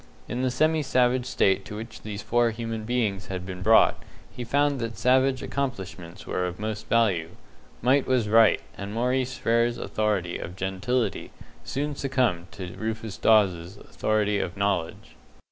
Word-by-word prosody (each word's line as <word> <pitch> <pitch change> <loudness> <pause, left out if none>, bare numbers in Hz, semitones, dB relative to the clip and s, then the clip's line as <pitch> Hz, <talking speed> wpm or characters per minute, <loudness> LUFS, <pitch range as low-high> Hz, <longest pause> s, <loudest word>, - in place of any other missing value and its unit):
In 120 - -3
the 130 - +1
semi 155 +4 +2
savage 125 -2 +2
state 95 -5 +2
to 105 - -7
which 110 +1 -8
these 105 -1 -6
four 120 0 +2
human 115 -1 -4
beings 110 -5 -1
had 90 -1 -5
been 90 -1 -7
brought, 110 +4 +5 0.3
he 125 - -5
found 140 +3 +1
that 115 -1 -4
savage 130 +1 +3
accomplishments 95 -9 -5
were 90 0 -1
of 90 +1 -7
most 110 0 -4
value. 100 -8 +2 0.5
Might 130 +2 +3
was 125 -4 +2
Right, 110 0 +5
and 100 +2 -6
Maurice 125 +2 0
Frere's 115 +1 +1
authority 105 -7 -1
of 90 - -7
gentility 95 +7 -2 0.3
soon 145 +2 -3
succumbed 125 -12 0
to 90 -2 -7
Rufus 110 -1 -4
Dawes's 95 -4 +2
authority 105 -1 0
of 85 0 -4
knowledge. 100 -4 -2
110 Hz, 155 wpm, -26 LUFS, 95-125 Hz, 0.5 s, brought